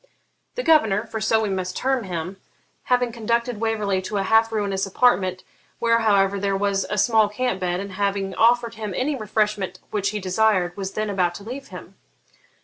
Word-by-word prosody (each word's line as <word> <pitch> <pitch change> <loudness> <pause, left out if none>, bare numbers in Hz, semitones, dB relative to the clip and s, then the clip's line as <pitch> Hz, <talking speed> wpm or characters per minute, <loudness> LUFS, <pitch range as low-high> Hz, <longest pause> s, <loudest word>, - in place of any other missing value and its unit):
The - - -2
governor, 220 - +3
for 220 -1 -6
so 220 +1 +2
we 210 - -1
must 185 -1 -3
term 260 -4 0
him, 180 +1 -5 0.5
having 250 -1 +1
conducted 235 0 -1
Waverley 215 -4 0
to 190 +2 -4
a 195 - 0
half 225 +3 +3
ruinous 200 -3 -1
apartment, 190 -4 +2 0.3
where, 230 0 +2
however, 200 -3 +2
there 195 0 0
was 200 0 0
a 210 - -2
small 215 0 +3
camp 210 -2 -2
bed, 180 -1 -1
and 200 0 -6
having 195 0 -1
offered 235 +1 +3
him 215 -4 -5
any 285 +3 0
refreshment 210 -4 -1
which 205 -2 0
he 210 +1 -3
desired, 185 -2 +1
was 195 -1 -5
then 215 -1 -2
about 180 -3 0
to 200 - -9
leave 260 +5 -7
him. - - -11
210 Hz, 185 wpm, -23 LUFS, 195-225 Hz, 0.5 s, governor